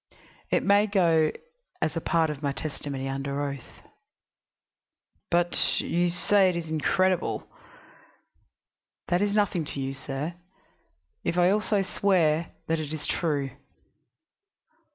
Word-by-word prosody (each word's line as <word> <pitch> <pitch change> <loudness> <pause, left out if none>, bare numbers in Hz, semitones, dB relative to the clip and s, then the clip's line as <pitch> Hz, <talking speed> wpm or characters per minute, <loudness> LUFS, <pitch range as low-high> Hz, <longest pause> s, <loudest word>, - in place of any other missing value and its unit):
It - - +2
may 205 +2 +4
go 165 -6 +3 0.5
as 155 - -1
a 165 - -1
part 160 -1 +2
of 150 -2 -7
my 140 -2 0
testimony 140 -2 -5
under 135 +1 -3
oath." 140 -3 -9 1.5
"But 175 0 +2 0.2
you 175 +1 +1
say 190 +2 +3
it 180 - -2
is 170 -1 -3
incredible." 185 +4 +1 1.6
"That 175 +1 +2
is 205 0 +1
nothing 205 -5 +2
to 140 - -5
you, 135 0 -2
sir, 140 +4 -4 0.9
if 170 - -1
I 180 +1 +5
also 210 -1 +1
swear 170 -5 +2 0.2
that 165 0 0
it 155 -2 -5
is 155 - -4
true." 145 -5 -1
165 Hz, 125 wpm, -27 LUFS, 145-185 Hz, 1.6 s, I